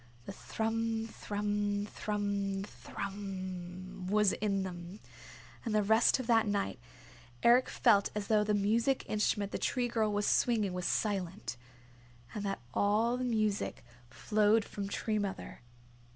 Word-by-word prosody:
The - - -6
thrum, 225 +2 -2
thrum, 205 -1 -2
thrum, 200 -2 -2
thrummmmmmmmmm 185 -2 -6
was 210 -1 +4
in 195 -2 0
them, 180 +1 -7 0.6
and 225 -3 -1
the 210 - +3
rest 220 +5 +4
of 255 - -3
that 225 -2 +4
night 200 -10 -1 0.6
Eric 245 +2 +5
felt 205 -5 +4
as 210 -1 -2
though 210 0 +3
the 210 0 +1
music 225 +6 +1
instrument 205 -1 0
the - - -3
Tree 250 -2 0
Girl 225 -3 +1
was 205 0 0
swinging 215 -6 +2
was 180 -1 -2
silent, 190 - -1 0.8
and 210 - -4
that 195 -10 -3
all 220 +4 +2
the 255 - -3
music 215 - -1 0.2
flowed 210 - +2
from 200 -1 -5
Tree 215 +1 -1
Mother. 200 -9 -5
205 Hz, 135 wpm, -32 LUFS, 195-220 Hz, 0.8 s, Eric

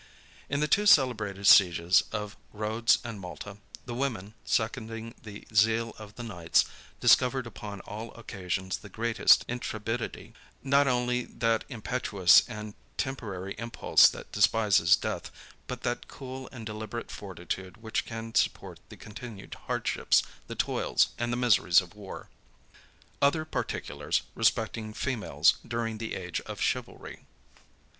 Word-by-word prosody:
In 140 +1 0
the 150 - +2
two 210 +6 +3
celebrated 110 - +3
sieges 90 -3 +6
of 105 -1 -4 0.2
Rhodes 110 +2 +2
and 115 -4 -6
Malta, 95 +2 -8 0.3
the 120 - -5
women, 120 -6 -3
seconding 115 0 -2
the 105 -2 -10
zeal 115 +2 +3
of 105 -1 -11
the 120 - -7
knights, 90 -8 +1 0.3
discovered 130 0 +4
upon 105 -3 -8
all 110 +3 -7
occasions 95 -4 -4
the 105 - -13
greatest 115 +3 +4
intrepidity; 115 -1 -4 0.3
not 140 +1 +4
only 125 -1 +1
that 115 -1 0
impetuous 110 -6 +4
and 105 -1 -7 0.2
temporary 100 -8 -4
impulse 115 0 +4
which - - -9
despises 100 -6 +4
death, - - -4 0.4
but - - -5
that - - -2
cool 130 -1 -8
and 120 -4 -9
deliberate 110 +2 -6
fortitude 95 -1 -6
which 110 0 -2
can 115 0 -7
support - - 0
the - - -11
continued 105 -1 -9
hardships, - - +2 0.2
the - - -6
toils, - - +1
and 120 0 -1
the 120 - -1
miseries 115 -8 +5
of 90 -1 -7
war. 105 -2 -9 0.9
OTHER 155 +3 +3
PARTICULARS 155 - -2
RESPECTING 110 -1 0
FEMALES 105 - +1
DURING 115 -2 -3
THE 115 -1 -4
AGE 90 -2 -4
OF - - -6
CHIVALRY. - - -3
110 Hz, 135 wpm, -29 LUFS, 100-120 Hz, 0.9 s, sieges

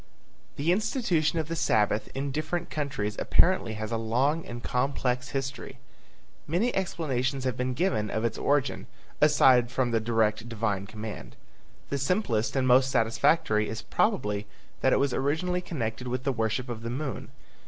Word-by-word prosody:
The 150 +5 +1
institution 180 - +1
of 160 -2 -1
the 165 - -3
Sabbath 105 -7 +1
in 140 +1 -2
different 155 +4 -3
countries 135 -9 -2
apparently 175 -12 +3
has 110 +1 -5
a 115 - 0
long 130 +8 +1
and 120 0 -7
complex 125 0 -1
history. 135 -1 -4 0.7
Many 185 +11 +1
explanations 140 -8 -1
have 130 -2 -1
been 125 0 -2
given 125 - 0
of 110 +3 -1
its 115 - -2
origin, 140 -2 0 0.3
aside 130 -5 +5
from 130 -1 0
the 115 - +2
direct 110 0 0
divine 105 -4 -2
command. 110 0 -7 0.5
The 140 - -1
simplest 135 - 0
and 130 -1 +2
most 130 +1 +5
satisfactory 115 -2 +2
is 110 - -5
probably 105 - 0 0.3
that - - +3
it - - +4
was 140 -2 +1
originally 160 +7 0
connected 125 -8 -4
with 125 +1 -2
the 135 -1 0
worship 115 +2 -1
of 120 -2 -5
the 115 - -4
moon. 135 +2 -4
130 Hz, 160 wpm, -28 LUFS, 115-150 Hz, 0.7 s, aside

